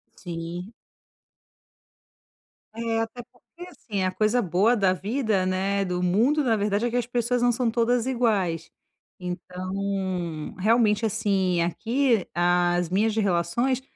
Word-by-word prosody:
Sim. 175 +2 -6 2.0
É. 225 0 -2
Até 225 +2 -5
porque, 350 +8 -14
assim. 205 - -4
A 185 - +1
coisa 215 +5 +1
boa 200 +5 +2
da 195 -4 +3
vida, 210 0 -1
né, 195 +2 0
do 180 -1 -2
mundo, 230 +12 +2
na 235 -4 +2
verdade 205 +1 0
é - - +1
que 240 - -1
as 245 - 0
pessoas 245 0 0
não 245 0 +4
são 240 0 0
todas 235 +1 +1
iguais. 205 -10 0 0.5
Então, 185 -2 -4
realmente, 215 +1 +3
assim, 195 -5 +1
aqui 230 +5 +1
as 175 0 +2
minhas 210 +4 +1
relações 215 +6 +1
205 Hz, 130 wpm, -25 LUFS, 180-235 Hz, 2.0 s, não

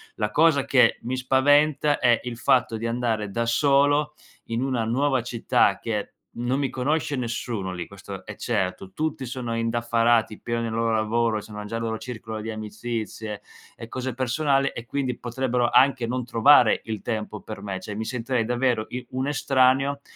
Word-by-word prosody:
la 105 0 -2
cosa 155 -2 +4
che 125 -4 +4
mi 130 +2 -3
spaventa 145 +3 +3
è 120 -1 +4
il 120 -2 -5
fatto 120 -3 +2
di 115 - -5
andare 115 -3 -1
da 115 +3 -1
solo 145 +4 +3 0.3
in 115 +1 -2
una 125 -4 0
nuova 130 +2 +1
città, 120 -1 +1
che 105 -3 -3 0.3
non 125 +3 0
mi 135 -3 0
conosce 145 +3 -1
nessuno 115 -5 -3
lì, 90 -1 -5
questo 100 -1 -9
è - - -7
certo, 95 0 -2
tutti 150 +1 -2
sono 120 -2 -4
indaffarati, 115 -1 +1
pieni 115 0 -2
nel 115 -1 -3
loro 115 0 0
lavoro, 110 0 +1
sono 105 0 -8
nel 115 +2 -4
loro 115 -1 -2
circolo 110 -2 -7
di 110 +1 -4
amicizie 110 0 -5 0.4
e 115 - -8
cose 130 +1 -4
personali 135 +2 +1
e 115 - -6
quindi 130 -2 -2
potrebbero 120 0 -1
anche 130 -3 +4
non 125 0 -2
trovare 120 +1 +5
il 110 -2 -4
tempo 105 -2 -4
per 110 -2 -8
me; 95 -2 -4
cioè 105 +2 -7
mi 110 - -3
sentirei 125 0 -1
davvero 120 -1 0
i 125 0 -6
un 130 +2 -2
estraneo 135 0 +2
120 Hz, 175 wpm, -25 LUFS, 110-130 Hz, 0.4 s, trovare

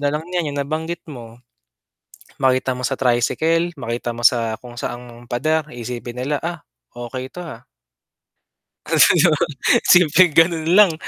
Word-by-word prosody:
nalang 145 +2 -1
niyan 175 -4 -1
yung 145 - -5
nabanggit 160 +3 -4
mo. 115 -3 -11 1.0
Makita 130 -1 +1
mo 125 - -3
sa - - -1
tricycle, 155 +7 0
makita 120 0 -4
mo 120 - -8
sa 115 -2 +3
kung 120 -1 -12
saang 120 0 -7
pader 150 +5 -1
isipin 120 +1 -6
nila, 145 +3 -1
"Ah, 170 -2 -4 0.3
okey 125 +2 -7
'to, 180 - -7
ah?" 155 -9 -9 1.3
Kasi - - +5
'di 165 - +5
ba, 150 - 0 0.4
simpleng 175 0 +5
ganun 165 -1 +3
lang 200 -6 +6
135 Hz, 145 wpm, -20 LUFS, 120-160 Hz, 1.3 s, lang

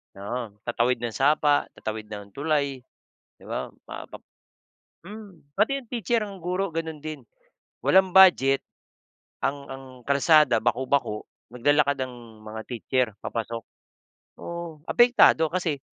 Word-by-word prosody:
oo. 105 +2 -5
Tatawid 120 +1 0
ng 115 - -2
sapa, 145 +3 +2
tatawid 110 -1 -5
ng 105 -2 -9
tulay, 140 0 -1 0.6
di - - -19
ba - - -4 0.2
mapap - - -10 0.8
mm, 195 -9 -12
pati 225 +8 +2
yung 255 - -12
teacher, 230 -1 -1
ang 195 -4 -10
guro 180 -1 -2
ganun 160 -2 -3
din. 155 +1 -7 0.6
Walang 190 -1 +4
budget 175 -8 +6 0.8
ang 140 +1 -1
ang 135 0 -8 0.2
kalsada 140 -3 +5
baku-bako, 125 -2 0 0.3
naglalakad 140 +2 +2
ang 120 -4 -11
mga 110 +1 -7
teacher, 125 +1 0 0.2
papasok. 115 0 -4 0.8
Oo, 170 -3 -7
apektado 240 -10 +5
kasi 170 -6 -1
140 Hz, 120 wpm, -25 LUFS, 120-170 Hz, 0.8 s, budget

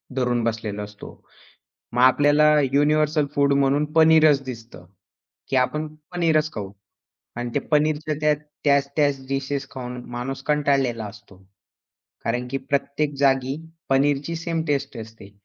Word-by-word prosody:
धरून 125 -2 0
बसलेलो 110 -3 -3
असतो. 105 0 -10 0.8
मग 125 - 0
आपल्याला 145 +3 +5 0.2
युनिव्हर्सल 150 +1 +2
फूड 140 0 +3
म्हणून 140 +1 +2
पनीरच 155 -3 +5
दिसतं. 115 -6 -9 0.6
की 135 - 0
आपण 150 +5 +1 0.3
पनीरच 160 -3 +1
खाऊ 100 -3 -6 0.6
आणि 120 0 -3
ते - - +3
पनीरच्या 155 0 +1
त्या 150 0 +3 0.3
त्याच-त्याच 140 -1 +1
डिशेस 135 0 -2
खाऊन 125 -1 -6
माणूस 125 +3 -5
कंटाळलेला 140 -6 +1
असतो. 100 -1 -13 0.9
कारण 120 +2 -1
की 135 - -1
प्रत्येक 140 +2 -2
जागी 135 0 +2 0.3
पनीरची 140 +3 +1
सेम 165 -1 -2
टेस्ट 140 -2 -1
असते. 110 -2 -11
140 Hz, 125 wpm, -23 LUFS, 125-150 Hz, 0.9 s, आपल्याला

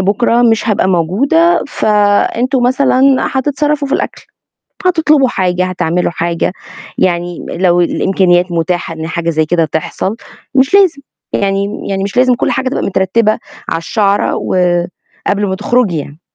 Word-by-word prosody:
بُكرة 230 +5 +2
مش 225 -1 +2
هبقى 200 -3 +1
موجودة 255 - +2
فأنتم 215 +3 +1
مثلًا 255 +1 +2 0.3
هتتصرفوا 290 +2 -1
في 275 - 0
الأكل، - - -3 0.6
هتطلبوا 310 -6 +3
حاجة، 185 -4 0
هتعملوا 180 -1 -1
حاجة، 170 0 -2 0.5
يعني 175 -1 -1
لو 175 0 +2
الإمكانيات 180 0 +1
متاحة 170 0 -2
إن 160 0 -6
حاجة 170 0 -2
زي 155 -1 +1
كده 165 +1 +1
تحصل 160 +7 -3 0.4
مش 270 +6 +2
لازم، 370 -8 +4 0.3
يعني 200 +1 -1
يعني 195 -1 -2
مش 200 - -5
لازم 255 0 +4
كُلّ - - -1
حاجة 260 -1 -1
تبقى 265 - -3
مترتّبة 210 +3 +1 0.3
على 165 - -1
الشعرة، 200 +3 0
و - - -3 0.7
قبل 205 +1 +1
ما 190 - -1
تخرجي 210 -4 +1
يعني. 145 +2 -8
200 Hz, 145 wpm, -13 LUFS, 175-255 Hz, 0.7 s, لازم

